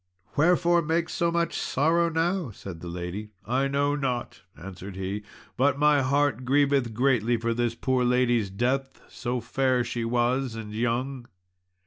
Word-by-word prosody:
"Wherefore 170 +2 +4
make 165 +1 0
so 170 - 0
much 170 0 0
sorrow 165 +5 +2
now?" 165 -1 0
said 95 -5 -9
the 85 - -8
lady. 90 +5 -5 0.2
"I 130 +4 +1
know 140 +1 +1
not," 130 -4 -3 0.2
answered 95 +3 -9
he, 95 +2 -3 0.4
"but 140 +2 +3
my 150 -1 +4
heart 140 -2 +1
grieveth 135 -3 +2
greatly 120 -2 +2
for 115 +1 -1
this 120 0 -1
poor 130 0 0
lady's 120 -4 +2
death, 130 +7 -1
so 120 +1 -3
fair 130 +2 +1
she 120 0 -3
was 120 +1 0
and 110 -2 -7
young." 120 +3 -2
125 Hz, 150 wpm, -26 LUFS, 115-145 Hz, 0.4 s, Wherefore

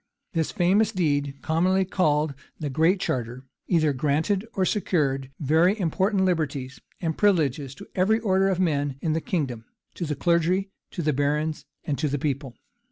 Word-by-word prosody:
This 165 -3 0
famous 205 +3 +3
deed, 145 -7 0
commonly 185 +4 +2
called 155 -5 +1 0.3
the 145 -3 -3
Great 165 +7 +3
Charter, 125 -6 -3 0.2
either 155 -5 +3
granted 155 - 0
or 190 - +2
secured 140 -10 0
very 165 +8 +3
important 190 +3 +1
liberties 140 -7 -1 0.2
and 160 -3 -1
privileges 145 - +1
to - - -11
every 205 +4 +2
order 195 -3 +2
of 185 -2 0
men 145 -6 +1
in 160 - 0
the 160 - 0
kingdom; 130 -11 -2 0.3
to 170 - -4
the 150 - -1
clergy, 175 +5 +1 0.2
to 175 - -4
the 150 0 +2
barons, 150 +2 -1 0.2
and 140 -4 -2
to 150 - +1
the 145 0 -1
people. 135 -3 -3
160 Hz, 165 wpm, -25 LUFS, 145-185 Hz, 0.3 s, famous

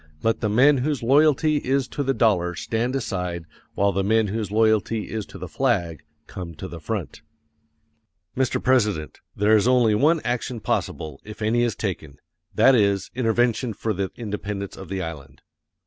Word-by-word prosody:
Let 115 0 +1
the 105 - -1
men 135 +6 +5
whose 140 -1 -1
loyalty 150 +3 +4
is 135 -1 0
to - - -4
the 135 -1 0
dollar 90 -6 +2
stand 120 +7 -2
aside 90 -9 -3 0.3
while 100 0 +2
the 95 0 -1
men 110 +1 +2
whose 110 0 -3
loyalty 110 0 +1
is 110 -2 -4
to - - -11
the - - -7
flag 90 - -1 0.2
come 85 -3 -8
to - - -7
the - - -8
front. - - -5 1.1
Mr. 130 0 0
President, 105 -12 +1 0.2
there 105 +2 +4
is 110 +2 +3
only 125 -4 +4
one 155 +10 +3
action 120 0 -2
possible, 75 -8 -3
if 105 +1 -8
any 115 +3 +2
is 120 -4 0
taken; 80 -8 -5 0.4
that 135 - +6
is, 100 -4 +2
intervention 120 0 +1
for 110 +2 -2
the 95 0 -2
independence 105 -3 -5
of - - -10
the 95 -1 -3
island. 80 -5 -9
110 Hz, 170 wpm, -23 LUFS, 100-125 Hz, 1.1 s, that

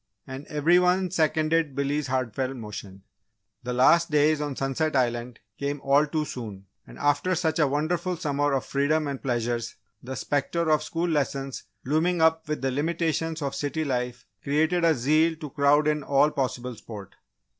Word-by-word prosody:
And 135 +2 -8
every 155 +4 +3
one 180 0 +2
seconded 155 -3 +1
Billy's 140 0 -1
heartfelt 130 0 -2
motion. 100 -3 -8 0.6
The 125 0 -4
last 170 +8 +4
days 150 0 +3
on 145 -2 -3
Sunset 135 +4 -1
Island 120 -1 -1 0.2
came 140 +1 -2
all 140 +2 +3
too 155 +1 -1
soon 105 -8 -7 0.2
and - - -12
after 145 +6 +1
such 160 -2 0
a 150 - +4
wonderful 170 +5 -1
summer 145 -1 0
of 135 - -1
freedom 145 +2 +1
and 140 -2 -4
pleasures, 120 -2 -2 0.3
the 130 +2 -6
spectre 155 +5 -1
of 155 - +3
school 170 +1 -2
lessons 140 -4 -2 0.2
looming 165 +6 +1
up 160 0 +3
with 150 -3 -3
the 135 - +1
limitations 160 +2 -1
of 140 - -2
city 155 +2 -2
life, 125 -3 -3 0.2
created 160 +5 +1
a 165 -1 +4
zeal 155 +6 +2
to 155 -3 -8
crowd 145 +2 +3
in 150 0 +1
all 140 +2 +3
possible 125 -3 -3
sport. 105 -3 -10
145 Hz, 165 wpm, -26 LUFS, 130-160 Hz, 0.6 s, last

